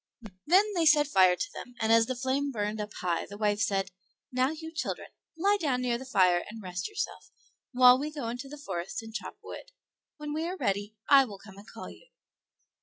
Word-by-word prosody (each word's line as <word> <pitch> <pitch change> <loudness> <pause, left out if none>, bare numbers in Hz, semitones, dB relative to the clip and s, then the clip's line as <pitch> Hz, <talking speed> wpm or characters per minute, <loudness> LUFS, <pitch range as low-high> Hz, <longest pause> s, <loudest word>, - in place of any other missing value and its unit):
Then 400 +6 +4
they 335 -4 +2
set 300 -1 +6
fire 185 -9 +5
to 410 - -4
them, 245 - -9
and 220 0 +1
as 230 0 +5
the 255 - -2
flame 265 +3 -1
burned 210 -2 -2
up 210 - -6
high 175 -2 -1
the 205 - -9
wife 210 -1 +1
said, 195 -3 0 0.4
"Now, 255 +1 +2
you 320 +1 -7
children, 305 - -4 0.3
lie 400 +5 +3
down 270 -6 +1
near 240 -1 0
the 260 - -9
fire 180 -6 +3
and 225 +1 -9
rest 185 - -5
yourself, 425 0 -5 0.4
while 250 0 +7
we 295 +2 -3
go 285 -6 -5
into 245 +4 -5
the 295 - -9
forest 190 -6 -5
and 225 0 -10
chop 235 - -6
Wood; - - -9 0.5
when 300 -1 -5
we 320 +2 -2
are 370 +2 -4
ready, 205 - -2
I 275 -1 +7
will 205 -5 -9
come 195 0 -14
and 205 - -15
call - - -9
you." - - -17
250 Hz, 215 wpm, -29 LUFS, 205-295 Hz, 0.5 s, while